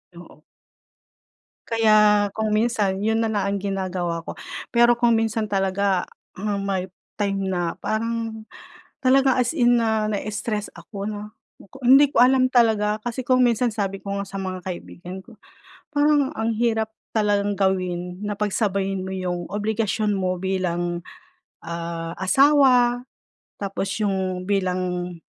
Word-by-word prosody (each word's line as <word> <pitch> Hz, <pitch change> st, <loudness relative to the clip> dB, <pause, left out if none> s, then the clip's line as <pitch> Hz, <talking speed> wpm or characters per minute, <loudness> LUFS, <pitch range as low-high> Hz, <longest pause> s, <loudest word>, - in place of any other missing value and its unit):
Oo. 170 Hz, -3 st, -14 dB, 1.2 s
Kaya, 215 Hz, -2 st, +4 dB
kung 220 Hz, 0 st, -1 dB
minsan 215 Hz, -3 st, +1 dB
'yon 220 Hz, +2 st, +1 dB
na 225 Hz, -, 0 dB
lang 210 Hz, -2 st, 0 dB
ang 200 Hz, 0 st, 0 dB
ginagawa 185 Hz, -4 st, -3 dB
ko. -, -, -5 dB, 0.4 s
Pero 240 Hz, 0 st, +5 dB
kung 240 Hz, -1 st, +3 dB
minsan 225 Hz, -1 st, 0 dB
talaga, 195 Hz, -2 st, 0 dB, 0.3 s
ah, 205 Hz, +1 st, -2 dB
may 190 Hz, -2 st, -2 dB, 0.3 s
time 195 Hz, -1 st, 0 dB
na 175 Hz, -2 st, -2 dB
parang 225 Hz, 0 st, -3 dB, 0.6 s
talaga, 265 Hz, 0 st, +4 dB
as 250 Hz, +2 st, +1 dB
in, 245 Hz, -5 st, +4 dB
na 220 Hz, -2 st, +1 dB
na-stress 210 Hz, +1 st, -3 dB
ako, 200 Hz, -2 st, -8 dB
'no. 210 Hz, 0 st, -7 dB, 0.4 s
Ko -, -, -13 dB
hindi 270 Hz, +3 st, +7 dB
ko -, -, -4 dB
alam 255 Hz, 0 st, +4 dB
talaga 220 Hz, -4 st, +3 dB
kasi, 240 Hz, +1 st, -3 dB
kung 255 Hz, 0 st, +4 dB
minsan, 240 Hz, +1 st, +2 dB
sabi 195 Hz, -2 st, -3 dB
ko 200 Hz, -, -8 dB
nga 200 Hz, -, -3 dB
sa 195 Hz, -, -7 dB
mga 185 Hz, -1 st, -5 dB
kaibigan 180 Hz, 0 st, -7 dB
ko, 235 Hz, 0 st, -17 dB, 0.5 s
parang 290 Hz, -2 st, +3 dB
ang 225 Hz, +1 st, 0 dB
hirap 220 Hz, -1 st, 0 dB, 0.2 s
talagang 205 Hz, -2 st, +1 dB
gawin 180 Hz, -1 st, -1 dB
na 210 Hz, 0 st, -2 dB
pagsabayin 195 Hz, -2 st, -1 dB
mo 190 Hz, -, -5 dB
'yong 175 Hz, -2 st, -3 dB
obligasyon 210 Hz, 0 st, -1 dB
mo 185 Hz, -2 st, -1 dB
bilang, 175 Hz, -2 st, -2 dB, 0.6 s
ah, 170 Hz, 0 st, -5 dB
asawa, 250 Hz, +1 st, +4 dB, 0.6 s
tapos 195 Hz, -1 st, -3 dB
'yong 190 Hz, -3 st, -1 dB
bilang, 180 Hz, -2 st, -1 dB
205 Hz, 140 wpm, -23 LUFS, 190-230 Hz, 1.2 s, hindi